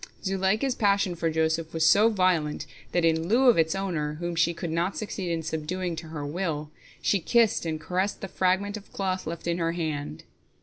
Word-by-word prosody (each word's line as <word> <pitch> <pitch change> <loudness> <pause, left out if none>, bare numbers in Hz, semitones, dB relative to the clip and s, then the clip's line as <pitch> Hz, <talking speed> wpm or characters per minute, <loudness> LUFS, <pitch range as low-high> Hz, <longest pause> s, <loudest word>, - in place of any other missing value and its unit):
Zuleika's 195 +7 +1
passion 200 -5 +2
for 165 -1 -1
Joseph 160 0 0
was 160 0 +2
so 215 +6 +6
violent 180 -8 +1 0.3
that, 175 -1 +2
in 160 0 +2
lieu 250 +6 +5
of 235 - +5
its 160 +2 +2
owner, 165 -6 -2
whom 175 +2 -4
she 170 0 +3
could 170 0 -5
not 170 +4 -1
succeed 200 -4 -4
in 165 -1 -1
subduing 165 +3 -3
to 160 0 -6
her 155 -2 -5
will, 155 -1 -3 0.3
she 200 - +3
kissed 225 0 +2
and 155 -1 -2
caressed 185 +5 -2
the 195 - -4
fragment 190 +3 0
of 205 - -13
cloth 185 -3 -2
left 165 0 -5
in 170 0 0
her 165 0 0
hand. 150 - -4
175 Hz, 200 wpm, -27 LUFS, 160-195 Hz, 0.3 s, so